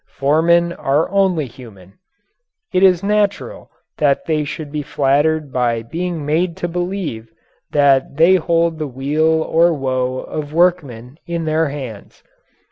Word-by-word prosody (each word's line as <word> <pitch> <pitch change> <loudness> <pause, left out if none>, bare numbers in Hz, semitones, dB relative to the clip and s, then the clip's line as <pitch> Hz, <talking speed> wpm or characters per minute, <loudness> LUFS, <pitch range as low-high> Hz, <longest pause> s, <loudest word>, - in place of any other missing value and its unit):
Foremen 170 +4 +2
are 145 +2 0
only 190 -6 +1
human. 105 -7 -14 0.8
It 185 - +2
is 185 -1 +4
natural 210 - -1 0.3
that 140 -2 +1
they 155 -2 0
should 150 0 -6
be 150 0 -3
flattered 145 +1 0
by 120 -2 0
being 165 +4 -4
made 165 +3 0
to 175 - -3
believe 175 - -4 0.4
that 140 -1 +2
they 170 +3 +5
hold 165 -1 0
the 155 - -2
weal 155 +5 0
or 170 +2 +3
woe 130 -2 -2
of 150 -1 -6
workmen 155 -7 0
in 170 -1 -3
their 155 0 +1
hands. 130 -8 -9
155 Hz, 135 wpm, -18 LUFS, 135-170 Hz, 0.8 s, they